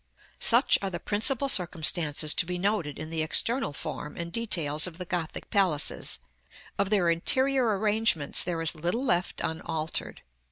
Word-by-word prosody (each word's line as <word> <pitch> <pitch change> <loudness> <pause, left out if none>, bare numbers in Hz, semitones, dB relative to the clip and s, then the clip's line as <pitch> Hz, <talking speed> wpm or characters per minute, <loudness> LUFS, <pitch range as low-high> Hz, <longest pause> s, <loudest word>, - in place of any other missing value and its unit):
§ - - -42 0.3
LIX. - - +3
Such 240 +4 +5
are 195 - -2
the 175 -2 -6
principal 230 +8 +2
circumstances 165 - +2
to 165 - -1
be 180 0 -4
noted 180 -6 -2
in 155 +1 -8
the 160 -1 -2
external 230 - +1
form 145 +1 -7
and 170 0 -6
details 165 -8 +1
of 165 -2 -10
the 180 - -7
Gothic 170 -2 -5
palaces; 185 -8 +1 0.6
of 200 -1 0
their 200 -5 +1
interior 245 +6 +1
arrangements 210 -7 0
there 165 -2 -3
is 160 - +3
little 175 - -3
left 175 -6 -1
unaltered. 160 -1 -4
175 Hz, 165 wpm, -27 LUFS, 160-210 Hz, 0.6 s, Such